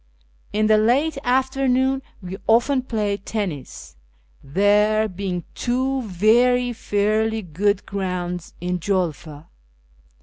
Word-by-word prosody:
In 215 +1 +1
the 215 0 +5
late 275 +7 +2
afternoon 265 +1 +1 0.2
we 185 +1 -6
often 245 +4 +3
played 210 -5 -2
tennis, 180 - -5 0.5
there 205 +8 +3
being 185 -2 -4
two 260 +2 -1
very 240 +5 +3
fairly 215 +1 0
good 190 +4 0
grounds 180 -3 -4
in 180 +1 -2
Julfa. 165 -5 -2
210 Hz, 100 wpm, -22 LUFS, 185-245 Hz, 0.5 s, the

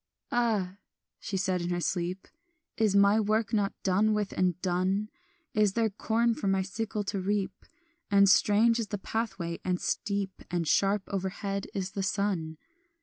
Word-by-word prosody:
"Ah," 215 -6 0 0.4
she 195 - -3
said 185 -1 0
in 175 - -3
her 175 0 0
sleep, 175 +2 -2 0.5
"Is 215 -3 +2
my 200 +2 +5
work 215 +1 0
not 205 -2 +1
done 205 +3 +3
with 210 -2 -1
and 180 -2 0
done? 190 +3 0 0.4
Is 210 -3 +3
there 225 -1 +1
corn 230 +3 +1
for 205 - -4
my 195 0 +2
sickle 210 +2 -3
to 200 -1 -3
reap? 195 0 -2 0.4
And 200 -1 +6
strange 215 +4 +4
is 225 - -2
the 205 - -3
pathway, 195 -5 -3
and 180 -1 0
steep, 200 0 -2
And 170 -2 -1
sharp 195 +4 +2
overhead 195 +1 -3
is 195 -1 -2
the 200 - -3
sun. 190 -5 -1
200 Hz, 160 wpm, -29 LUFS, 185-210 Hz, 0.5 s, And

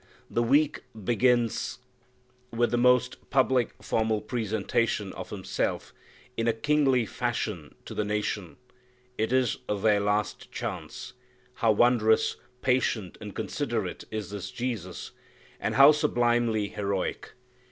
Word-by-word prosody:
The 120 - +1
week 145 +6 +3 0.2
begins 120 +1 +1 0.7
with 120 +1 +1
the 120 - +2
most 125 0 +2
public, 130 -2 +2
formal 110 -1 +1
presentation 110 -2 -1
of - - -7
Himself - - -3 0.4
in 115 - -1
a 115 - +4
kingly 135 -1 +2
fashion - - -3
to - - -7
the 105 - -1
nation. 105 -3 -3 0.6
It 110 +2 0
is 130 -3 +2
their 105 0 +3
last 105 +1 -1
chance. - - -6 0.4
How 115 - +2
wondrously 110 -1 +3 0.2
patient 125 -6 +1
and - - -8
considerate - - -3
is 105 -4 -5
this 100 -2 -5
Jesus! 110 -8 -4 0.5
And - - -2
how 140 +2 +9
sublimely 120 -7 +1
heroic! 100 -2 -3
115 Hz, 120 wpm, -28 LUFS, 105-125 Hz, 0.7 s, how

